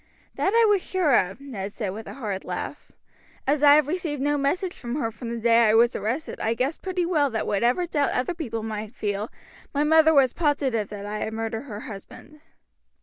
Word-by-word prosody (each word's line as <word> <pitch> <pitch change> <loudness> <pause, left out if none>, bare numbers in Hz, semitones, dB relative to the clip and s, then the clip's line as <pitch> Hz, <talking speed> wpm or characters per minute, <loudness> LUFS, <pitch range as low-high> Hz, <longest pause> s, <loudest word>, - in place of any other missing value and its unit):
"That 395 - 0
I 465 -1 +6
was 410 -3 +3
sure 360 -7 +1
of," 190 +2 +1
Ned 210 -8 -6
said 210 -4 -3
with 220 +2 -8
a - - -8
hard 205 -7 -4
laugh. - - -6 0.5
"As 285 +1 +1
I 290 -1 +8
have 300 -1 +4
received 320 -3 -2
no 290 +2 +1
message 320 +6 -1
from 240 +1 -4
her 230 -6 -1
from 230 +2 -8
the 235 - -3
day 230 0 +4
I 215 - +4
was 235 +2 +4
arrested 235 +10 -3
I 225 +1 0
guessed 265 +6 -2
pretty 365 -2 -1
well 305 -5 +2
that 225 -3 -2
whatever 240 - +1
doubt 295 -4 0
other 255 +8 -1
people 235 -10 -4
might 215 +1 -5
feel, 205 +1 -2 0.5
my 290 - +2
mother 320 +1 +5
was 275 -5 +4
positive 275 - 0
that 205 -1 -7
I 210 +1 -4
had 220 - -3
murdered 225 +2 -3
her 210 -5 -7
husband." 230 +9 -11
255 Hz, 210 wpm, -25 LUFS, 220-300 Hz, 0.5 s, I